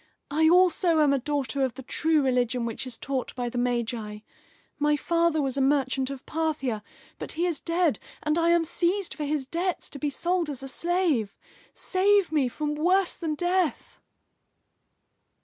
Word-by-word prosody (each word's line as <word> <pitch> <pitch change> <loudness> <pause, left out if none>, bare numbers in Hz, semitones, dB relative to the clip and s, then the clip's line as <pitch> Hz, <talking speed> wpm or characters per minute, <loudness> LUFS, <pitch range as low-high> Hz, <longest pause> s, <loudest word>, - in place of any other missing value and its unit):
I 315 +2 +4
also 355 -1 +4
am 290 -2 +4
a 275 - +1
daughter 280 0 -1
of 255 -3 -1
the 265 - -8
true 315 +3 +1
religion 250 -2 +1
which 230 +3 -5
is 245 - -3
taught 265 -2 -4
by 245 -1 -2
the 245 0 -3
Magi. 235 -3 -2 0.6
My 295 0 +2
father 335 -1 +1
was 270 0 -1
a - - +2
merchant 265 -1 +1
of 275 -1 -8
Parthia, 300 -8 -2 0.4
but - - -5
he 335 +2 0
is 340 -4 -1
dead, 335 -3 +1 0.2
and 300 0 +1
I 335 0 +2
am 340 -1 +4
seized 350 +4 0
for 300 - -4
his 290 -2 -1
debts 350 +5 -3
to 280 - -7
be 295 - -1
sold 345 +3 -1
as 270 -2 -5
a - - -5
slave. 320 - 0 0.3
Save 390 -1 +2
me 295 -5 +2
from 295 +5 -3
worse 360 +5 +2
than 315 -3 -3
death!" 355 0 -1
295 Hz, 175 wpm, -26 LUFS, 260-340 Hz, 0.6 s, I